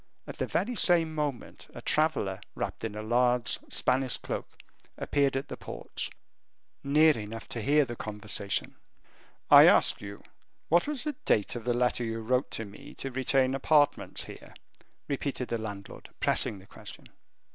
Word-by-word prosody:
At - - -9
the - - -2
very 245 +4 -1
same 170 -6 +4
moment, 145 -5 -4
a - - -8
traveler, 145 -12 0
wrapped - - -4
in 110 -2 -4
a 105 - -5
large 120 +1 +1
Spanish 130 0 +1
cloak, - - -5 0.5
appeared 140 -2 +1
at 135 - -4
the - - -6
porch, - - -6 0.7
near 150 +2 +5
enough 110 +1 -7
to 115 - -4
hear 145 +5 +3
the 120 -1 -6
conversation. 105 -2 -2 0.7
"I - - +10
ask - - +4
you 100 0 -9 0.5
what 170 - +3
was 295 -4 -3
the 300 0 -2
date 105 +2 +1
of 120 -2 -6
the 120 -1 +1
letter 125 0 +1
you 115 0 -3
wrote 125 +3 0
to 115 - -4
me 100 0 -13
to 135 - -5
retain 130 0 +1
apartments 145 +1 +1
here?" - - -12 0.5
repeated 140 -2 -3
the 115 - -1
landlord, 100 -3 -8
pressing 105 - +3
the 95 - -15
question. - - -12
125 Hz, 160 wpm, -29 LUFS, 110-145 Hz, 0.7 s, I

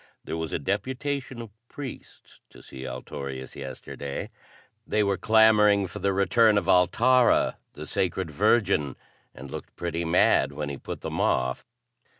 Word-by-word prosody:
"There - - -5
was 80 -1 -4
a - - 0
deputation 130 - -3
of 110 - -12 0.2
priests 140 -4 -10
to - - -16
see 65 0 -8
Altorius 65 +1 -7
yesterday. 70 0 -6 0.6
They 105 - +2
were 100 -1 +1
clamoring 105 0 +5
for 90 - -7
the 100 - +1
return 105 +3 +4
of 100 - 0
Altara 120 +8 +4 0.2
the - - -8
Sacred 90 -2 -2
Virgin 100 - +2 0.4
and 65 +2 -10
looked - - -8
pretty 85 -1 -3
mad 85 -3 +3
when 75 0 -4
he 70 - -5
put - - -7
them - - -3
off." 65 0 0
95 Hz, 150 wpm, -26 LUFS, 70-110 Hz, 0.6 s, clamoring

